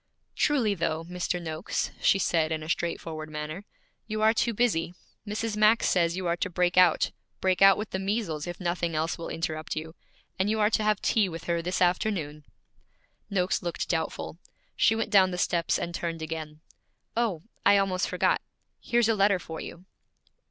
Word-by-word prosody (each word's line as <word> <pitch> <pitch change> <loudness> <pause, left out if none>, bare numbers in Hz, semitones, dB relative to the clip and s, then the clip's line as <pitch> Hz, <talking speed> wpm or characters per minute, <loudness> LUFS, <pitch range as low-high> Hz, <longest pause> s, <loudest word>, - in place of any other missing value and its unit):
'Truly, 255 -8 +2
though, 165 -3 -1
Mr. 180 +1 -3
Noakes,' 160 -2 -3
she - - +4
said 165 -4 +1
in 155 -1 -2
a 155 - -8
straightforward 165 -2 -3
manner, 155 +5 -6 0.4
'you 215 -1 -3
are 220 +1 +5
too 235 +1 +1
busy. 200 -7 0 0.3
Mrs. 215 +1 -2
Max 215 +2 +4
says 170 -1 +2
you 185 - -3
are 170 0 +1
to 205 - -2
break 180 0 +1
out, 180 -3 +5 0.3
break 185 -1 +1
out 195 0 +8
with 210 0 -5
the 190 - -2
measles 190 -6 -2
if 175 0 -6
nothing 170 -2 -1
else 160 +2 -1
will 165 - -5
interrupt 160 -1 -3
you, 160 +1 -5 0.5
and 190 +2 +2
you 220 0 0
are 210 +1 +3
to 220 - +2
have 210 -1 +1
tea 210 -4 +2
with 165 -1 -7
her 170 -1 -1
this 180 +2 0
afternoon.' 175 -5 -1 0.8
Noakes 185 -2 0
looked 175 -2 -3
doubtful. 165 0 -3 0.4
She 220 - +4
went 225 -1 -2
down 190 -3 +6
the 180 - -4
steps 170 -1 +1
and 170 - -4
turned 165 -2 -3
again. 155 -1 -6 0.5
'Oh, 220 -9 0 0.2
I 200 0 +6
almost 195 -2 0
forgot - - +1 0.4
here's 240 -2 +2
a 225 - +3
letter 200 -1 +3
for 160 -2 -8
you.' 175 +2 -9
180 Hz, 185 wpm, -27 LUFS, 165-205 Hz, 0.8 s, out